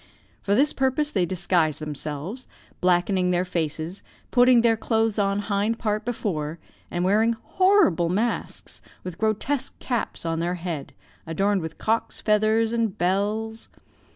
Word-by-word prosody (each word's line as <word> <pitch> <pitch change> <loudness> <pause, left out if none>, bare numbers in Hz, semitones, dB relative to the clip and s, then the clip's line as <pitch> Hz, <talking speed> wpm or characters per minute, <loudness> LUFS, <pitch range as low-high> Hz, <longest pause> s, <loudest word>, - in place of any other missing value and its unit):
For 200 - +1
this 285 +6 +3
purpose 270 +3 +1
they 185 -7 +1
disguise 175 -4 +1
themselves, 155 - -5 0.3
blackening 180 +1 +2
their 180 0 +1
faces, 165 +1 -3 0.3
putting 245 -1 +6
their 230 -1 +4
clothes 225 -1 0
on 200 0 +1
hind 205 +2 0
part 215 -1 -1
before, 170 -10 -3 0.3
and 175 +1 -1
wearing 220 +4 +3
horrible 230 - +3
masks, 220 +6 -2 0.2
with 180 -1 -7
grotesque 245 +6 -1
caps 240 -8 -3
on 165 0 -1
their 175 +2 -1
head, 170 -5 -5 0.3
adorned 195 +4 +1
with 160 0 -6
cocks' 225 +1 -1
feathers 220 +1 +2
and 230 -4 0
bells. 210 +5 -1
200 Hz, 135 wpm, -24 LUFS, 175-225 Hz, 0.3 s, putting